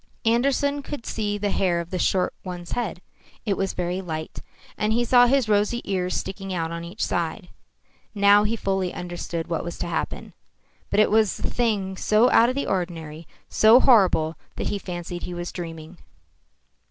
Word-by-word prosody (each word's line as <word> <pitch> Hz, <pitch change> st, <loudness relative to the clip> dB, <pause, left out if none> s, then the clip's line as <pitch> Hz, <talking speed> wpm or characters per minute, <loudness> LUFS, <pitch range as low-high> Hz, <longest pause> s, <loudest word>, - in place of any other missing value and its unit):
Andersen 275 Hz, +5 st, +2 dB
could 280 Hz, -3 st, -7 dB
see 205 Hz, -2 st, -2 dB
the 205 Hz, 0 st, -1 dB
hair 180 Hz, -3 st, +1 dB
of 170 Hz, 0 st, -6 dB
the 185 Hz, -, -2 dB
short 185 Hz, 0 st, +1 dB
one's 175 Hz, -2 st, -7 dB
head. 210 Hz, -7 st, -3 dB, 0.4 s
It 200 Hz, -3 st, +1 dB
was 195 Hz, 0 st, -2 dB
very 180 Hz, +1 st, -2 dB
light. 160 Hz, -3 st, -6 dB, 0.4 s
And 215 Hz, +1 st, 0 dB
he 240 Hz, +1 st, +1 dB
saw 245 Hz, 0 st, +6 dB
his 265 Hz, -2 st, +2 dB
rosy 210 Hz, +3 st, +2 dB
ears 185 Hz, -2 st, -1 dB
sticking 195 Hz, 0 st, -5 dB
out 165 Hz, -2 st, -2 dB
on 170 Hz, 0 st, -5 dB
each 175 Hz, +6 st, -3 dB
side. 175 Hz, +2 st, -3 dB, 0.7 s
Now 200 Hz, 0 st, +6 dB
he 215 Hz, +2 st, 0 dB
fully 190 Hz, -4 st, -1 dB
understood 175 Hz, -1 st, -4 dB
what 165 Hz, -2 st, -2 dB
was 170 Hz, -, -6 dB
to -, -, -3 dB
happen. -, -, -4 dB, 0.6 s
But 205 Hz, -, +3 dB
it 215 Hz, -, +3 dB
was 215 Hz, -2 st, +3 dB
a -, -, -9 dB
thing 205 Hz, -6 st, -1 dB
so 215 Hz, +6 st, +3 dB
out 230 Hz, +1 st, +6 dB
of 255 Hz, -, -2 dB
the 280 Hz, -, -1 dB
ordinary, 165 Hz, -4 st, -4 dB, 0.2 s
so 220 Hz, +3 st, +6 dB
horrible, 180 Hz, -, +4 dB, 0.2 s
that -, -, -3 dB
he 205 Hz, -, -2 dB
fancied 175 Hz, -1 st, -6 dB
he 180 Hz, -, -6 dB
was 175 Hz, 0 st, -5 dB
dreaming. 165 Hz, -1 st, -8 dB
190 Hz, 180 wpm, -24 LUFS, 175-220 Hz, 0.7 s, saw